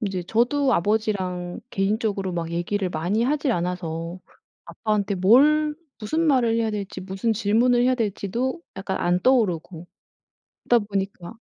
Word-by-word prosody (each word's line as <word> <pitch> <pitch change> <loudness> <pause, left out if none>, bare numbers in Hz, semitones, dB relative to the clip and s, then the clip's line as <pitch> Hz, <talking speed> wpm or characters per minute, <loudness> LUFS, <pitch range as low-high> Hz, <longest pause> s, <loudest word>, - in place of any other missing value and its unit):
이제 195 -5 -2
저도 250 +8 +1
아버지랑 185 -3 -1
개인적으로 200 -1 -1
막 165 -1 -3
얘기를 185 +3 -1
많이 180 +7 -1
하질 280 0 +1
않아서 170 -1 -3 0.4
아빠한테 210 -2 -1
뭘 295 +11 +4 0.2
무슨 315 +10 -1
말을 240 -5 +3
해야 225 -1 0
될지 200 -2 -5
무슨 190 +4 -2
질문을 230 +3 +2
해야 255 +1 +3
될지도 230 - -2 0.2
약간 195 0 -3
안 175 +1 +1
떠오르고 180 -9 +1 0.8
그러다 235 -3 +4
보니까 195 -1 -4
205 Hz, 315 characters per minute, -24 LUFS, 180-240 Hz, 0.8 s, 뭘